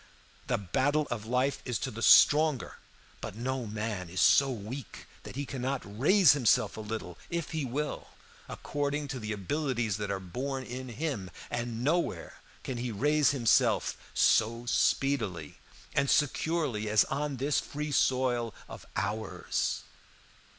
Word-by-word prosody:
The - - +1
battle 145 - 0
of 110 -2 -4
life 130 +3 0
is 125 -3 -2
to 130 - -4
the 115 +1 -7
stronger, 150 +1 +5 0.4
but - - -6
no 125 +1 -3
man 105 -4 -4
is 95 +2 -4
so 140 0 +5
weak 120 +1 -7 0.2
that - - -10
he 140 +1 -3
cannot 130 0 -3 0.2
raise 185 +5 +6
himself 130 -6 +2
a 110 - -6
little 105 -5 -6
if 170 -2 -3
he 155 -3 -2
will, 145 +5 -3 0.4
according 145 0 -3
to 130 - -4
the 110 -1 -4
abilities 115 - -1
that 105 -1 -4
are 100 -1 -1
born 130 +9 -4
in 130 +1 -7
him; 120 - -3 0.2
and 120 -1 -3
nowhere 170 +5 -1 0.2
can 130 - -4
he 120 0 -3
raise 145 +6 +3
himself 120 -5 +2 0.2
so 115 +2 +3
speedily 110 - 0 0.3
and 140 -1 +1
securely 145 -7 +1
as 110 0 +5
on 140 0 -3
this 140 +3 +1
free 150 +1 -5
soil 125 -4 +1
of - - -11
ours. 110 0 -2
125 Hz, 145 wpm, -30 LUFS, 110-145 Hz, 0.4 s, raise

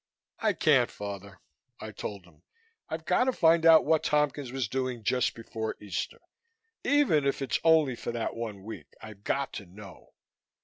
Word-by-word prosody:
"I - - +2
can't, - - +3
Father," 100 -1 -8 0.4
I - - -7
told 100 -3 -7
him. 85 -4 -22 0.5
"I've 160 0 -5
got 180 +8 +3
to 260 - +2
find 165 -6 +4
out 160 -1 +8
what 160 +1 +3
Tompkins 145 -3 0
was 130 -3 -2
doing 130 -1 -3
just 125 +3 +1
before 110 -1 -5
Easter. 100 -4 -5 0.6
Even 280 - +3
if 140 0 0
it's 135 -3 -1
only 160 -6 +4
for 120 - -5
that 115 -1 -3
one 110 -4 -6
week, 110 +2 -10
I've 105 -2 -11
got 140 +5 -1
to 100 - -7
know." 95 +1 -14
125 Hz, 170 wpm, -29 LUFS, 105-155 Hz, 0.6 s, out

